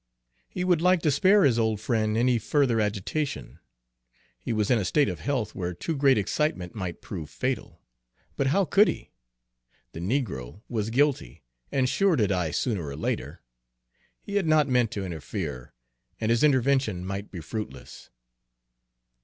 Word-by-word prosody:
He 180 - -3
would 175 -3 +2
like 180 -1 +3
to 150 - +3
spare 195 +8 +5
his 125 -5 +3
old 110 -2 +1
friend 110 -1 0
any 120 0 +3
further 120 0 +2
agitation; 105 +8 -3 0.8
he - - -5
was 110 -1 0
in 120 - +4
a - - -1
state 145 +8 +2
of - - -4
health 125 -7 -2
where 90 -2 -4
too 160 - -3
great 135 -2 +4
excitement 100 - -1
might 90 -5 -5
prove 85 -7 -6
fatal. - - -4 0.5
But 135 - 0
how 190 +8 +3
could 205 +4 +5
he? - - -4 0.8
The - - -8
negro 95 - -3
was 110 -2 -2
guilty, 130 - 0 0.3
and 130 -2 +2
sure 180 +7 +2
to 115 -7 +2
die 90 -4 0
sooner 100 - -1
or 70 - -5
later. 75 - -3 0.8
He 200 0 -2
had 190 -5 0
not 155 -2 +4
meant 125 -3 +2
to 100 -2 -3
interfere, 80 - -5 0.5
and 110 0 0
his 115 +3 +2
intervention 130 -9 +2
might 100 +2 -5
be 90 - -7
fruitless. 105 +7 -7
115 Hz, 160 wpm, -26 LUFS, 95-145 Hz, 0.8 s, spare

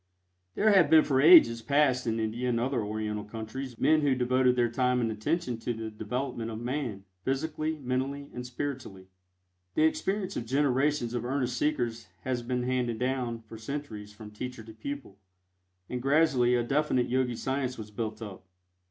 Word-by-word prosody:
There 215 +1 +4
have 180 -7 +5
been 160 -1 +7
for 135 -2 +2
ages 150 -8 +8
past 135 -1 +2
in 115 0 0
India 115 +3 -1
and 115 -1 +1
other 125 -1 0
Oriental 105 0 -3
countries 115 +4 -7
men 155 0 +4
who 140 -3 +2
devoted 125 0 +3
their 120 -1 +3
time 125 +1 +1
and 115 -2 0
attention 125 +3 -2
to 120 +1 -2
the 110 0 -5
development 115 +2 -4
of 110 -1 -5
Man, 120 -5 -3 0.2
physically, 155 +4 -1
mentally 135 +1 -2
and 125 - -5
spiritually. 125 -7 -6 0.7
The - - +3
experience 190 +4 0
of 115 - -4
generations 135 -1 +1
of 120 -2 -2
earnest 125 -1 -1
seekers 120 -6 -1
has 125 +1 -2
been 125 +1 -2
handed 125 -2 0
down 125 -2 -2
for 110 0 -11
centuries 110 -5 -6
from 105 0 -11
teacher 125 +2 -6
to 110 0 -12
pupil, 110 -3 -7 0.7
and 125 0 -4
gradually 135 -3 +3
a 120 - +1
definite 135 -1 +1
Yogi 125 -1 0
science 130 +1 -2
was 105 -1 -8
built 110 +1 -4
up. 95 -3 -9
125 Hz, 170 wpm, -29 LUFS, 115-140 Hz, 0.7 s, ages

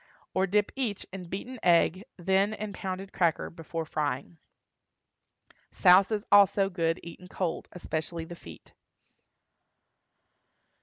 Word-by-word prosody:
Or 190 +1 +2
dip 205 +2 +1
each 240 -7 -2
in 190 -2 -6
beaten 240 +7 -6
egg, 175 +3 +3
then 190 +4 +2
in 210 -1 -5
pounded 190 0 -5
cracker, 170 -3 +1
before 165 0 -5
frying. 145 - -3 1.3
Souse 185 +2 +6
is 210 -1 -1
also 200 -1 +5
good 165 -2 0
eaten 170 +2 -10
cold, 180 -2 -3
especially 165 -1 -4
the 175 - -9
feet. 85 - -14
185 Hz, 115 wpm, -28 LUFS, 165-195 Hz, 1.3 s, Souse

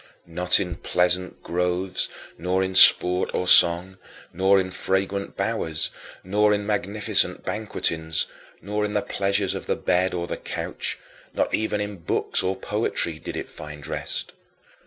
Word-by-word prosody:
Not 90 +2 +2
in 90 -3 -4
pleasant 90 +1 -1
groves, 90 +2 -1 0.3
nor 90 +2 -1
in 95 0 -3
sport 90 0 +6
or 90 - -1
song, 90 +2 +5 0.3
nor 95 +2 +3
in 95 -1 -3
fragrant 95 +1 -2
bowers, 80 -1 -1 0.3
nor 105 +2 +2
in 105 0 -4
magnificent 105 0 +1
banquetings, 85 -6 -1 0.4
nor 105 +1 -2
in 105 0 -2
the 105 - +1
pleasures 100 -1 0
of - - -7
the - - +1
bed 90 +1 0
or 85 -1 -2
the - - -5
couch; - - -4 0.4
not - - 0
even 110 -1 0
in 105 -1 -4
books 85 - -1
or 95 +1 -1
poetry 95 -5 -2
did - - -7
it - - -5
find 75 -2 -10
rest. - - -4
95 Hz, 150 wpm, -24 LUFS, 90-100 Hz, 0.4 s, sport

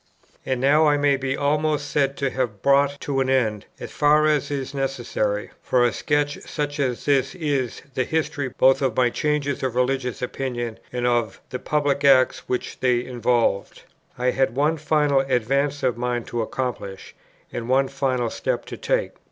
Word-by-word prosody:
And 130 -1 0
now 145 +4 +4
I 145 -1 +4
may 145 -1 +3
be 135 0 -2
almost 150 0 0
said 140 -1 +1
to 135 -2 -1
have 120 -7 -3
brought 140 +1 +3
to 140 -2 -1
an 130 0 +1
end, 110 -6 +1
as - - -7
far 150 +1 +4
as 150 -3 +1
is 140 -1 -4
necessary 120 -6 -2
for 125 -1 +2
a 120 - +1
sketch 145 0 0
such 145 0 -4
as 125 -4 -1
this 135 0 +2
is, 140 -8 -2
the 130 - 0
history 145 -2 -2
both 130 +2 +3
of 130 -5 0
my 125 -1 +3
changes 150 -1 -1
of 130 -3 -2
religious 125 -1 -1
opinion 120 -3 -4
and 125 -1 -2
of 120 -4 0
the 125 - -3
public 145 0 0
acts 130 -2 +4
which 125 - -3
they 125 -1 +1
involved. 120 -4 0 0.3
I 125 0 +1
had 130 -3 0
one 150 +4 +2
final 150 -2 +2
advance 135 +2 0
of 125 -3 +1
mind 120 -1 -2
to 120 - -2
accomplish, 110 -5 -4 0.4
and 120 +1 -4
one 135 +1 +3
final 130 -4 -1
step - - -2
to - - -8
take. - - 0
135 Hz, 175 wpm, -23 LUFS, 125-145 Hz, 0.4 s, now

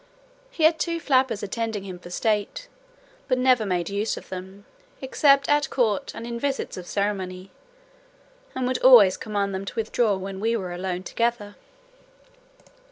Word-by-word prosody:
He 355 -10 -4
had 320 +1 +5
two 335 -1 -1
flappers 260 -8 +1
attending 220 0 -3
him 185 -2 -8
for 175 - -12
state, 210 - -1 0.6
but 255 - +1
never 250 -4 +3
made 175 -3 -1
use 205 +2 -2
of - - -11
them, 190 +2 -9 0.3
except 275 +1 +3
at 290 -1 +2
court 220 -6 0
and 230 - -7
in 235 0 -5
visits 275 +1 -2
of 180 -1 -8
ceremony, 190 -2 -3 1.0
and 260 -1 -1
would 255 0 -1
always 230 -8 +7
command 200 -2 -3
them 190 +1 -3
to - - -7
withdraw, 220 -1 +1
when 190 0 -6
we 230 +3 0
were 185 -4 -5
alone 180 0 -4
together. 230 -2 -2
215 Hz, 160 wpm, -24 LUFS, 190-255 Hz, 1.0 s, always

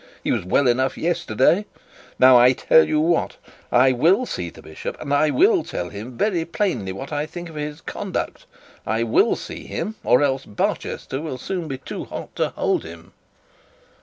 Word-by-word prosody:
He - - 0
was - - 0
well 130 +9 +2
enough 130 +2 +1
yesterday. 170 - +1 0.5
Now 130 0 +7
I 125 +1 +7
tell 160 +5 +4
you 155 - +1
what, 165 +2 +1 0.3
I 130 +2 +5
will 170 - +3
see 90 - -4
the - - -15
bishop; 80 - -7
and 145 -2 -3
I 150 +2 +3
will 375 - +4
tell 90 - -5
him 105 +4 -7
also 125 - -11 0.2
very 170 -3 -1
plainly 165 - -2
what 135 +10 -7
I 150 +1 -1
think 175 +1 -8
of 160 - -12
his 150 +1 -5
conduct. 195 0 -5 0.4
I 115 +1 0
will 115 - +3
see - - -8
him, 215 - -3
or 125 - +4
else 135 -1 0
Barchester 130 +5 -3
will 155 -5 -5
soon 175 +5 -4
be 135 -3 -4
too 130 - -7
hot - - -8
to - - +1
hold - - -1
him.' - - -12
145 Hz, 190 wpm, -22 LUFS, 125-170 Hz, 0.5 s, Now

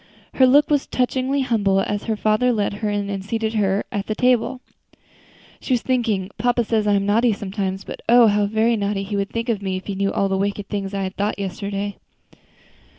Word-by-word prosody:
Her 260 - +5
look 290 +3 +4
was 290 -2 +2
touchingly 260 +2 0
humble 205 -7 +1
as 205 +1 -3
her 220 - 0
father 215 +4 +2
led 210 -3 0
her 215 - 0
in 205 -1 -1
and 195 -1 -4
seated 220 +2 -2
her 200 -2 +1
at 205 -1 -3
the 215 - -2
table. 250 +1 +2 1.0
She 260 - -2
was 240 - 0
thinking, 220 -7 0
"Papa 245 0 +2
says 220 -1 0
I 205 - +3
am 200 0 +1
naughty 225 +3 +3
sometimes, 195 -1 -4
but - - -8
oh! 240 0 +7
how 205 -1 +3
very 220 +3 +2
naughty 200 -1 -1
he 205 +1 -4
would 200 0 -1
think 230 -2 -2
me 190 -1 -2
if 185 - -9
he 200 - -3
knew 195 +1 0
all 195 - +1
the 190 0 -1
wicked 200 +1 -2
feelings 200 -1 -3
I 195 - -1
had 200 +2 -2
yesterday." 200 +1 -4
210 Hz, 210 wpm, -21 LUFS, 200-235 Hz, 1.0 s, oh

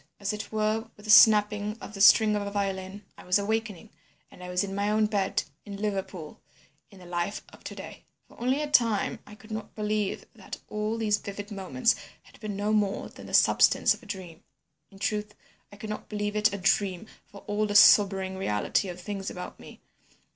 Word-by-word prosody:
as 200 +1 -2
it 210 -1 -6
were 215 +1 -1
with 210 - -15
the 215 - +1
snapping 210 0 +6
of 205 - -10
the 195 - -5
string 215 +1 +7
of 205 - -1
a 200 - -4
violin, 195 0 -3 0.2
I - - -11
was 180 +2 +2
awakening, 210 -2 -3 0.4
and 180 - -13
I 180 - -7
was 180 +1 0
in 195 -1 -5
my 200 +1 -1
own 215 0 +2
bed 205 -3 0 0.2
in 200 -2 -8
Liverpool, 190 -6 -4 0.5
in 200 - -17
the 180 - -14
life 175 +3 -3
of - - -18
to - - -7
day. - - -10 0.2
"Only 255 +3 -1
for 300 - -1
a 295 - -5
time 230 -7 +2
I 210 - -12
could 215 +1 -16
not 215 0 -6
believe 210 -1 -2
that - - -9
all 210 +1 -2
these 210 -2 +1
vivid 205 +1 -7
moments 230 +5 +1 0.3
had - - -20
been 215 -3 -5
no 205 +2 -1
more 205 -2 0
than - - -12
the - - -1
substance - - +4
of - - -12
a 230 - -16
dream. 185 -5 -8 0.5
"In 195 - -16
truth, 210 +1 -3 0.4
I - - -12
could 215 +1 -7
not 210 - -7
believe 210 0 -3
it 210 +1 +3
a 200 - -4
dream 190 0 +1 0.2
for 200 - -13
all 210 +1 -1
the 205 - -4
sobering 195 -2 +6
reality 145 - 0
of 180 0 -7
things 195 +1 -5
about 180 - -8
me. - - -13
205 Hz, 210 wpm, -27 LUFS, 195-215 Hz, 0.5 s, string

